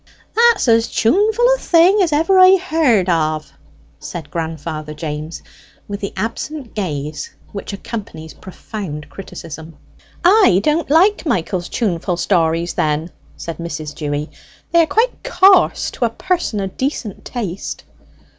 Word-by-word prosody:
"That's 465 - +4
as 230 0 +4
tuneful 420 - +2
a - - -9
thing 360 +5 +4
as 350 -4 +2
ever 330 +6 +3
I 370 +1 +8
heard 310 - +2
of," 155 -3 0 0.5
said 160 -4 -8
grandfather 160 -2 -5
James, 155 +1 -6 0.4
with 200 -1 -5
the 200 - -4
absent 235 +5 -4
gaze 150 -7 -4 0.2
which 200 - -6
accompanies 200 -6 -7
profound 170 -6 -8
criticism. 160 -2 -9 0.5
"I 365 - +6
don't 305 0 +1
like 360 +4 +3
Michael's 180 - -1
tuneful 180 -5 -1
stories 170 -2 +1
then," 155 +2 -1 0.3
said 165 - -6
Mrs. 160 -3 -5
Dewy. 150 0 -4 0.4
"They 340 - +5
are 325 - +2
quite 465 +7 0
coarse 385 -6 +4
to 245 - -1
a - - +1
person 345 - -2
o' - - -1
decent 225 0 -4
taste." 200 -7 -5
200 Hz, 135 wpm, -18 LUFS, -, 0.5 s, I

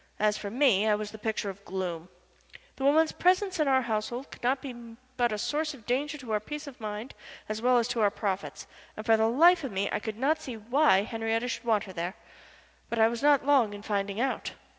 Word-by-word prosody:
As 210 0 +2
for 205 - -5
me, 225 -4 +3
I 210 - +4
was 210 0 -5
the 220 - -10
picture 215 -2 -2
of 195 +1 -16
gloom. 180 -3 -4 0.7
The 270 - -5
woman's 310 +3 +4
presence 370 0 +2
in 305 - +2
our 260 -1 +3
household 235 +3 -3
could - - -12
not 260 +2 +1
be 265 -1 -7 0.4
but 240 -2 +1
a 215 - -2
source 300 +6 -2
of 230 -6 -17
danger 285 +6 -1
to 255 -6 -8
our 210 - +2
peace 295 +8 -7
of 270 -4 -11
mind 215 +4 -5 0.3
as 215 +1 -4
well 250 +1 +4
as 235 -1 +2
to 235 - -1
our 205 - +5
profits, 200 -1 -4 0.3
and 215 - -6
for 225 -1 +5
the 220 0 +3
life 335 +7 +5
of 270 - -4
me 195 +1 -1
I - - 0
could 215 0 -5
not 305 +6 +1
see 250 -6 -6
why 230 -2 +3
Henriette 225 +2 -2
should 240 - -6
want 220 -3 +2
her 190 - -10
there. 175 +3 -4 0.7
But 235 - -3
I 220 0 +6
was 235 0 -4
not 285 -2 +4
long 255 -8 +3
in 205 - -10
finding 200 -1 -2
out. 265 +2 -1
230 Hz, 235 wpm, -28 LUFS, 210-275 Hz, 0.7 s, I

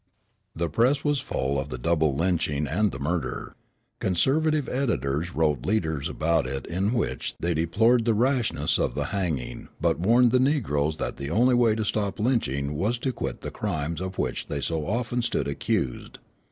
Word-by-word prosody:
The 85 +1 -1
press 125 - +2
was 145 -2 +1
full 70 - -1
of 70 +2 -4
the 65 - -4
double 80 +1 +1
lynching 80 -3 0
and 105 +8 +1
the - - -6
murder. 80 +5 -3 0.5
Conservative 150 - +1
editors 90 - -1
wrote 75 -6 +1
leaders 80 -9 0
about 80 -3 +1
it 65 0 -4
in 95 +6 -1
which 90 - -2
they 85 +1 0
deplored 110 +9 +3
the 115 -2 +3
rashness 125 +1 +1
of - - 0
the 70 - -1
hanging 85 -10 -2
but 85 -1 +1
warned 120 +6 +4
the 125 - +4
negroes 80 - +1
that - - -3
the 70 0 -4
only 120 +9 +3
way 120 -3 +4
to 110 -1 -1
stop 100 -1 -1
lynching 75 - 0
was 105 +11 0
to 130 +2 -2
quit 65 - -4
the - - -5
crimes 85 -5 -3
of 95 0 -5
which - - -2
they 70 - -3
so 80 +1 -2
often 120 +3 -1
stood 120 -9 -1
accused. 70 -2 -2
90 Hz, 180 wpm, -26 LUFS, 75-120 Hz, 0.5 s, warned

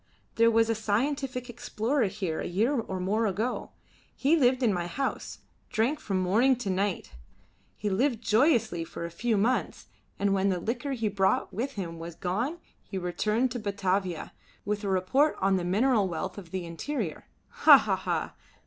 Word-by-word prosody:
There 230 0 +4
was 225 0 +3
a 225 - +2
scientific 250 +4 -1
explorer 240 +1 -1
here 185 -5 -3
a - - -3
year 215 +10 +1
or 215 -8 -2
more 210 +5 +1
ago. 215 +6 -2 0.5
He 285 +4 +3
lived 260 -3 +3
in 220 -4 +3
my 175 -1 -2
house: 270 +9 -3 0.3
drank 235 +8 0
from 195 -2 -2
morning 220 +9 +3
to 235 -6 -3
night. 195 0 -1 0.7
He 210 - -3
lived 230 +5 +1
joyously 225 - +2
for 170 - -6
a 170 - -6
few 225 +5 0
months, 235 +6 0 0.3
and 200 0 +1
when 195 0 +2
the 185 -2 0
liquor 240 +8 -3
he 225 -4 -1
brought 195 -1 +1
with 255 +7 -3
him 170 -6 -5
was 165 0 -7
gone 230 - -2 0.2
he 195 - -7
returned 210 +7 0
to 245 - -3
Batavia 195 -4 -2 0.3
with 210 +1 -2
a 200 - -1
report 190 +11 +2
on 195 0 +2
the 180 - -2
mineral 210 +3 +2
wealth 175 +3 -4
of 180 -4 -12
the 185 0 -4
interior. 170 - -4 0.2
Ha, - - +8
ha, - - 0
ha! - - -2
210 Hz, 175 wpm, -28 LUFS, 190-245 Hz, 0.7 s, Ha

